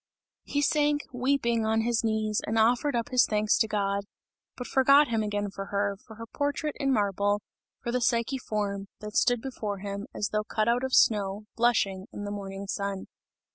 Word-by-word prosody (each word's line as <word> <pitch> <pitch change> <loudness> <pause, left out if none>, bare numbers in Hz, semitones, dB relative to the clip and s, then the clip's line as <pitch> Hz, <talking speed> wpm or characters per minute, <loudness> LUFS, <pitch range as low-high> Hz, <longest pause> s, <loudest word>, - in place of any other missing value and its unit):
He 285 0 0
sank, 295 -1 +2
weeping, 245 -3 +1
on 220 0 +2
his 235 0 0
knees 220 -1 0
and 220 - 0
offered 245 +5 +3
up 235 0 -1
his 255 -1 +4
thanks 210 0 +2
to 220 - +3
God 200 -1 -1 0.5
but 250 - -5
forgot 275 +3 +5
him 225 -2 +1
again 205 -1 -2
for 195 0 -6
her, 200 0 -1
for 220 - -11
her 230 +1 -8
portrait 285 +4 -2
in 275 -1 +1
marble, 205 -2 +1 0.4
for 235 - -2
the 250 +1 0
Psyche 235 +2 +1
form, 200 -3 -3
that 210 0 -8
stood 245 -2 +2
before 215 -6 -4
him, 200 +1 -5
as 205 - -2
though 210 0 0
cut 215 0 -1
out 240 +2 +2
of 265 -1 +1
snow, 205 -1 +3
blushing, 205 -5 +1
in 205 - -7
the 205 - -4
morning 195 -1 -6
sun. 200 -1 -3
220 Hz, 190 wpm, -28 LUFS, 205-245 Hz, 0.5 s, forgot